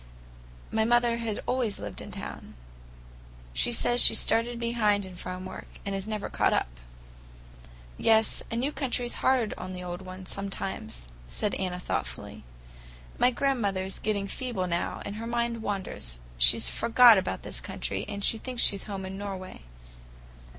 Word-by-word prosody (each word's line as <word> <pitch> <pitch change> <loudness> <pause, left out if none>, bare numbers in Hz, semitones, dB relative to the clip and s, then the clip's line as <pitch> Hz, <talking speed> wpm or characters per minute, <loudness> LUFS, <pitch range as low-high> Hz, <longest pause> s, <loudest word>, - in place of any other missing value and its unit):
My 220 0 +2
mother 240 0 +3
had 230 -3 -3
always 240 -5 0
lived 105 -2 -5
in - - -8
town. - - -7 1.0
She 240 - +2
says 240 +1 +4
she - - +9
started 230 +2 +2
behind 215 -4 +1
in 185 -1 -10
farm 185 +1 -6
work, - - -8 0.2
and 195 0 -2
never 215 -2 -3
has - - -11
caught - - +3
up." - - -1 1.2
"Yes, 220 -1 +4
a - - -3
new 260 +5 0
country's 245 -4 -2
hard 255 -4 +3
on 185 0 -5
the 180 0 -6
old 175 +1 -5
ones, 185 0 -9
sometimes," 190 - -4 0.2
said 205 - 0
Anna 180 -1 -2
thoughtfully. 60 - -4 0.8
"My 250 - +6
grandmother's 205 -8 0
getting 205 -2 -1
feeble 230 -4 -2
now, 170 -1 -2
and 205 +1 -5
her 230 +1 -5
mind 235 -1 -1
wanders. 190 - -3 0.2
She's - - +5
forgot 230 -2 +7
about 185 - -3
this - - -6
country, - - -4
and 200 -1 -5
thinks 240 +2 +1
she's 200 -2 +3
at - - -12
home 195 -2 -4
in 190 +1 -6
Norway. 190 - -6
205 Hz, 155 wpm, -28 LUFS, 185-235 Hz, 1.2 s, she